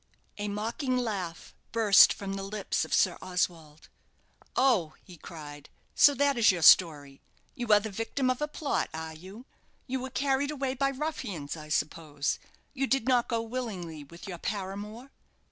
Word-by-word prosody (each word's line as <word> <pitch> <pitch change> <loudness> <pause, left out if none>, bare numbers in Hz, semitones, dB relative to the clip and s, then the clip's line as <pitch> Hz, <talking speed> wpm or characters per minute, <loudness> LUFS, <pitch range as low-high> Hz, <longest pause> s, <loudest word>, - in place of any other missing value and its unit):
A 205 - -2
mocking 230 +6 -2
laugh 195 -9 -4 0.2
burst 220 -4 +7
from 195 -1 -4
the 195 - -4
lips 200 +1 -2
of - - -8
Sir 185 - +2
Oswald. 170 -4 -3 0.7
"Oh," 225 -12 +2
he 180 - -13
cried, 145 -3 -10 0.2
"so 285 - +6
that 280 -3 +2
is 225 - +6
your 180 -4 +1
story. 145 -6 +5 0.3
You 240 -1 -5
are 210 - +8
the 215 +1 -6
victim 225 +6 -2
of 255 - -4
a 300 - 0
plot, 300 -1 -2
are 160 0 -6
you? 190 +9 -12 0.4
You 260 0 -3
were 260 +1 -5
carried 275 +1 0
away 275 -3 -2
by 275 +1 +1
ruffians, 255 - -4
I 155 -1 -10
suppose? 150 -2 -1 0.3
You 270 -1 -1
did 265 -2 +1
not 250 -2 +3
go 230 -2 0
willingly 200 -10 -5
with 170 +7 -12
your 175 -3 -6
paramour? 210 +6 -5
205 Hz, 165 wpm, -29 LUFS, 170-255 Hz, 0.7 s, are